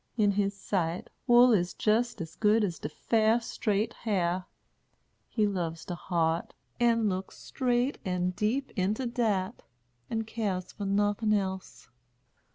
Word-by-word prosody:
In 205 -2 +4
his 200 0 0
sight, 175 -3 -2 0.2
wool 240 0 +7
is 180 -3 +1
jist 225 +1 +1
as 165 -1 -7
good 215 +1 +3
as 175 -5 -2
de 145 - -4
fair, 220 +6 +2
straight 225 -1 -1
hair. 185 -4 -1 0.8
He 215 -3 +1
loves 170 -5 -2
de 180 - -4
heart, 170 -2 -1 0.2
and 230 -2 +3
looks 190 -1 -3
straight 250 +1 0
and 180 -1 -1
deep 240 +8 -1
into 210 +7 0
dat, 220 -6 -1 0.5
and 225 0 -2
keres 200 -5 -3
fur 205 - -5
nothin' 205 +2 +1
else. 190 -2 -3
205 Hz, 140 wpm, -29 LUFS, 185-225 Hz, 0.8 s, wool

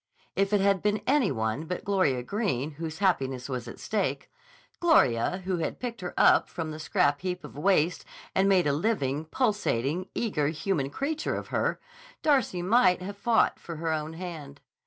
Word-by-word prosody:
If 195 +1 +1
it 205 -2 +3
had 195 -2 +3
been 210 0 0
any 270 - +3
one 110 +5 -2
but 180 +2 -4
Gloria 185 -11 +1
Greene 160 - -1
whose 160 +1 -6
happiness 135 -10 0
was 125 -3 -4
at 120 - -9
stake, 215 -2 -2 0.5
Gloria 185 - +3
who 185 -1 0
had 165 - -3
picked 235 -4 -5
her 180 - -5
up - - +5
from 160 -2 -4
the 155 - -7
scrap 145 -1 +1
heap 180 -1 -3
of - - -10
waste 170 +1 +2 0.3
and 195 +1 +3
made 185 -3 +4
a 145 - +2
living, 150 -5 0
pulsating, 185 - 0
eager 170 -11 0
human 155 -2 -1
creature 290 - -2
of - - -6
her, - - 0 0.4
Darcy 265 - +2
might 185 -3 +4
have 200 +2 -6
fought 225 +2 +2
for 170 - -7
her 160 0 -1
own 155 0 -3
hand. 160 -5 -8
180 Hz, 180 wpm, -28 LUFS, 145-200 Hz, 0.5 s, up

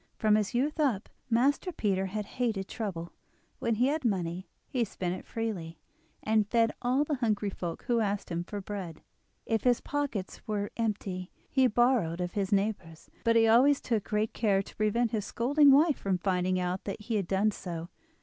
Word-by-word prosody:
From 215 -1 +3
his 210 +1 +1
youth 295 +6 0
up, 250 -9 +1 0.2
Master 275 +10 +2
Peter 195 - 0
had 210 +2 -3
hated 215 -5 -2
trouble; 180 -7 -5 0.5
when 230 -1 0
he 240 +4 +2
had 300 +2 0
money 185 -5 -1 0.2
he 255 -4 0
spent 180 -4 -3
it 185 - -8
freely, 190 -8 -4 0.5
and 215 -1 +2
fed 230 -1 +3
all 255 +4 +2
the 295 -1 -2
hungry 215 -4 0
folk 175 -3 -5
who 240 -2 +1
asked 205 -3 -1
him 170 0 -1
for 205 +3 -6
bread. 190 -5 -6 0.4
If 225 -2 0
his 245 -2 +4
pockets 285 -10 -3
were 205 -1 -2
empty 200 -5 -2 0.2
he 265 -1 +4
borrowed 235 -8 +2
of 180 0 -2
his 195 -1 -2
neighbours, 195 -5 -1
but 230 0 +3
he 225 0 +5
always 265 +6 +5
took 220 -5 -1
good 210 +1 -1
care 200 -4 +2
to - - -14
prevent 215 +2 +1
his 210 -3 -1
scolding 285 +5 +4
wife 295 +2 +5
from 195 -2 0
finding 185 0 0
out 180 +1 -2
that 200 +1 -4
he 225 +2 -4
had 195 -4 -2
done 200 +3 +2
so. 170 -4 -6
210 Hz, 190 wpm, -30 LUFS, 190-240 Hz, 0.5 s, he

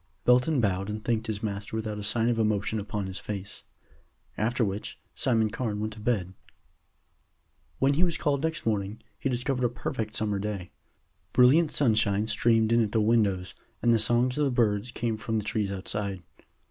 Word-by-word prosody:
Belton 125 +4 +4
bowed 100 -3 0
and 105 0 -5
thanked 115 -1 0
his 105 -1 -3
master 100 0 -4
without 110 -1 -3
a - - -5
sign 110 +2 +1
of 120 -1 +1
emotion 110 0 0
upon 105 -1 -3
his 95 0 -5
face. 100 -1 -6 0.7
After 115 +2 +1
which 100 +1 -5
Simon 115 -5 +1
Carne 115 -3 -3
went 110 0 -3
to 110 - -11
bed. 105 -5 -1 1.4
When 135 +1 +3
he 160 +5 +2
was 170 -3 +1
called 140 -2 0
next 160 0 -2
morning, 105 -1 -2 0.2
he 135 - -1
discovered 125 +1 -1
a 120 - +3
perfect 110 -2 -4
summer 105 -2 0
day. 100 -3 -4 0.6
Brilliant 150 +6 +5
sunshine 110 -7 +2
streamed 115 0 +2
in 115 0 +5
at 105 -2 -1
the 115 - +3
windows, 105 -4 +2 0.3
and 120 -1 +5
the 115 - +3
songs 120 +5 +3
of 150 - +3
the - - +2
birds 115 -2 +1
came 115 -2 -2
from 110 +1 -2
the 105 - -2
trees 105 -2 -1
outside. 100 -1 -3
110 Hz, 185 wpm, -27 LUFS, 105-120 Hz, 1.4 s, Brilliant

